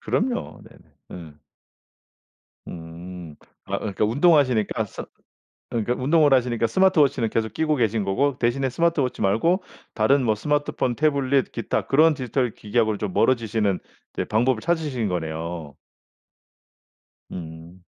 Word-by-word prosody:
그럼요. 240 +2 -2
네네. - - -19 0.2
음. 80 -4 -10 1.3
음. 85 0 -9 0.3
아 - - -3
그러니까 105 0 -2
운동하시니까 130 - +2
스 - - -8 0.7
그러니까 120 +1 -1
운동을 145 +3 +3
하시니까 120 -3 +2
스마트 185 +7 +3
워치는 130 -5 +2
계속 110 -1 -1
끼고 155 +2 0
계신 115 -4 0
거고 130 +8 0
대신에 130 +3 0
스마트 165 +4 +1
워치 130 -2 -1
말고 165 - +2 0.3
다른 130 +5 +3
뭐 110 -3 +2
스마트폰, 145 0 -1
태블릿 140 -2 +1
기타 115 - -2
그런 155 +3 +5
디지털 125 -2 -1
기기하고 110 0 0
좀 100 -2 -3
멀어지시는 110 -5 +1 0.3
이제 - - -2
방법을 120 +2 +1
이제 - - -14
찾으신 150 -9 0
거네요. 80 -2 -4 1.6
음. 85 +1 -9
120 Hz, 315 characters per minute, -23 LUFS, 100-140 Hz, 1.6 s, 그런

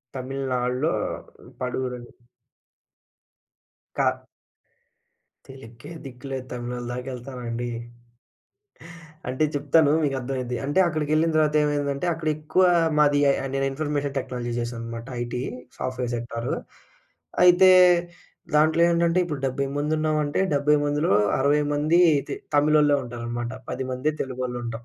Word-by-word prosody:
తమిళనాడులో 130 +1 -1 0.7
పడూరని. 125 -1 -4 1.9
కా - - +3 1.4
తెలుక్కే 125 +1 -12
దిక్కు 125 -1 -11
లేదు 130 -1 -4
తమిళోళ్ళ 120 0 -5
దాకేళ్తానండి? 125 -1 -5 1.6
అంటే 130 +4 0
చెప్తాను 145 +1 +3
మీకు 140 -2 0
అర్థమైద్ది. 125 -1 -3
అంటే 145 +6 +1
అక్కడికెళ్ళిన 155 0 +1
తర్వాత 155 -1 +2
ఏమైందంటే, 145 +1 -1
అక్కడ 160 -1 -5
ఎక్కువ 155 +4 0 0.4
మాది 145 -1 +4
ఎ - - +6 0.2
నేను 135 - +1
information 145 -1 -2
technology 120 -2 -4
జేసానన్నమాట 115 0 -5
IT 120 +1 -3 0.4
software 125 -1 -3
sector. 120 0 -4 0.9
అయితే 185 +1 +7 0.8
దాంట్లో 155 +2 +4
ఏంటంటే 170 +1 +2
ఇప్పుడు 150 -5 -5
70 135 +1 -2
మంది 150 +2 0
ఉన్నామంటే, 155 -2 0
70 150 +1 +3
మందిలో 145 -3 0 0.3
60 145 +2 +3
మంది 155 +4 +2 0.3
తె - - -2 0.2
తమిళోళ్ళే 150 0 +4
ఉంటారనమాట. 120 0 -5 0.2
పదిమందే 130 +3 -2
తెలుగోళ్ళు 125 -1 -4
ఉంటాం. 115 0 -6
135 Hz, 105 wpm, -24 LUFS, 125-150 Hz, 1.9 s, అయితే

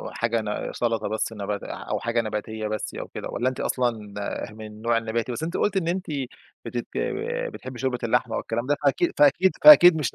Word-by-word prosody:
وحاجة 115 -1 -1
ن 105 -1 -4
سلطة 115 -3 -1
بس 110 +1 -2
نبات 100 -1 -4
أو - - -4
حاجة 115 +1 0
نباتية 110 0 -4
بس 105 0 -4
أو - - -6
كده - - -7
والّا 125 +2 -1
أنتِ 130 - -4
أصلًا 115 -5 -1 0.4
ه - - -14
من 110 0 -9
النوع 110 +2 -1
النباتي؟ 115 +2 -2
بس 135 - -5
أنتِ 170 +2 -2
قُلتِ 205 - 0
إن 175 -3 0
أنتِ 185 +2 -2 0.6
بتت - - -4 0.7
بتحبي 130 -1 -8
شوربة 130 -1 -1
اللحمة 120 0 +1
والكلام 120 +2 -3
ده، 145 +1 +2
فأكيد 145 +5 +2
فأكيد 150 +6 +5
فأكيد 180 - +10
مش 150 -7 -2
120 Hz, 195 wpm, -25 LUFS, 110-140 Hz, 0.7 s, فأكيد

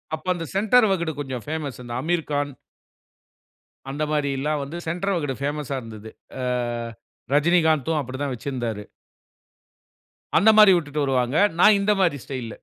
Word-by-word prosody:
அப்போ 160 +3 -14
அந்த 165 -1 -5
சென்டர் 220 +3 +4
வகுடு 170 -4 0
கொஞ்சம் 130 -4 -5
ஃபேமஸ் 150 -4 -4
அந்த 120 -1 -7
அமீர்கான் 150 -3 -1 1.4
அந்த 145 +3 -3
மாரி 150 -2 0
எல்லாவந்து 150 +2 -2
சென்டர் 180 +4 -1
வகுடு 145 -5 -2
பேமஸ்‌ஸா 145 -1 -2
இருந்தது. 110 -2 -10 0.3
ஆ - - -3 0.9
ரஜினிகாந்தும் 160 -1 +3
அப்படித்தான் 130 +1 -4
வச்சிருந்தாரு. 120 -4 -4 1.5
அந்த 215 - +6
மாரி 210 -2 +9
விட்டுட்டு 150 -3 -1
வருவாங்க. 130 -1 0 0.2
நான் 210 +3 +7
இந்த 200 +1 +2
மாரி 175 -6 +2
ஸ்டைல். 130 -4 -5
145 Hz, 130 wpm, -23 LUFS, 135-170 Hz, 1.5 s, மாரி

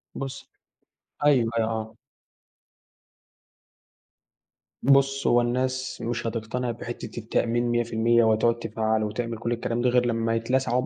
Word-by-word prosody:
بُصّ 135 -1 -6 0.8
أيوه، 130 -6 +4
أي 115 - +3
آه. 110 0 -3 2.9
بُص 135 +1 +3
هو 120 - +5
الناس 130 +2 -2
مش 120 0 -2
هتقتنع 115 +2 -3
بحتة - - -7
التأمين 120 +1 0
100% 120 0 +2
وهتقعد 115 +1 +2
تفعّله 110 -1 -1
وتعمل 115 +2 -3
كل 115 +1 -3
الكلام 120 0 -1
ده 125 - +3
غير 125 0 +3
لمّا 115 -1 0
يتلسعوا 125 +2 0
120 Hz, 115 wpm, -25 LUFS, 115-125 Hz, 2.9 s, هو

